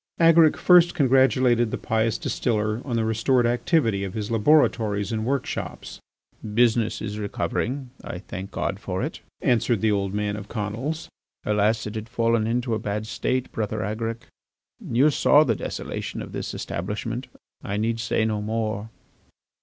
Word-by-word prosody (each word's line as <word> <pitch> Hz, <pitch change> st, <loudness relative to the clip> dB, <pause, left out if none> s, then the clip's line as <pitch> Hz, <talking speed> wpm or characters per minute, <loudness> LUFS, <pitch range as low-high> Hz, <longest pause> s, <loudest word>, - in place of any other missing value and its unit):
Agaric 165 Hz, -2 st, +6 dB
first 175 Hz, -1 st, +5 dB
congratulated 130 Hz, -4 st, +3 dB
the -, -, -3 dB
pious 110 Hz, 0 st, 0 dB
distiller 110 Hz, -1 st, -1 dB
on 125 Hz, -4 st, -3 dB
the 115 Hz, -1 st, +1 dB
restored 115 Hz, +3 st, +2 dB
activity 120 Hz, -, +1 dB
of 95 Hz, -2 st, -5 dB
his 105 Hz, 0 st, -3 dB
laboratories 110 Hz, -5 st, +2 dB
and 110 Hz, 0 st, -2 dB
workshops. 135 Hz, -1 st, -3 dB, 0.6 s
"Business 115 Hz, -2 st, +2 dB
is 105 Hz, -1 st, -4 dB
recovering. 125 Hz, +5 st, -2 dB
I -, -, -6 dB
thank 95 Hz, +1 st, -7 dB
God 95 Hz, -1 st, -3 dB
for 95 Hz, -2 st, -3 dB
it," -, -, -4 dB, 0.2 s
answered 115 Hz, -3 st, +2 dB
the 110 Hz, -, +3 dB
old 100 Hz, -2 st, 0 dB
man 105 Hz, 0 st, -1 dB
of 105 Hz, -1 st, -8 dB
Conils. 115 Hz, +10 st, -4 dB, 0.4 s
"Alas! 105 Hz, +1 st, +1 dB
it 105 Hz, -, -5 dB
had 110 Hz, 0 st, -6 dB
fallen 115 Hz, -2 st, +1 dB
into 120 Hz, +1 st, 0 dB
a 110 Hz, -, 0 dB
bad 105 Hz, +1 st, -3 dB
state, 130 Hz, +3 st, -2 dB
Brother 110 Hz, -1 st, -2 dB
Agaric. 115 Hz, +3 st, -3 dB, 0.6 s
You 135 Hz, +6 st, +3 dB
saw 145 Hz, +1 st, +5 dB
the 120 Hz, -, +1 dB
desolation 85 Hz, -, -5 dB
of -, -, -10 dB
this -, -, -5 dB
establishment. 110 Hz, +7 st, -4 dB, 0.4 s
I 100 Hz, -, -3 dB
need 115 Hz, +2 st, 0 dB
say 110 Hz, 0 st, 0 dB
no 105 Hz, -1 st, -1 dB
more." 110 Hz, 0 st, -2 dB
110 Hz, 155 wpm, -24 LUFS, 105-125 Hz, 0.6 s, Agaric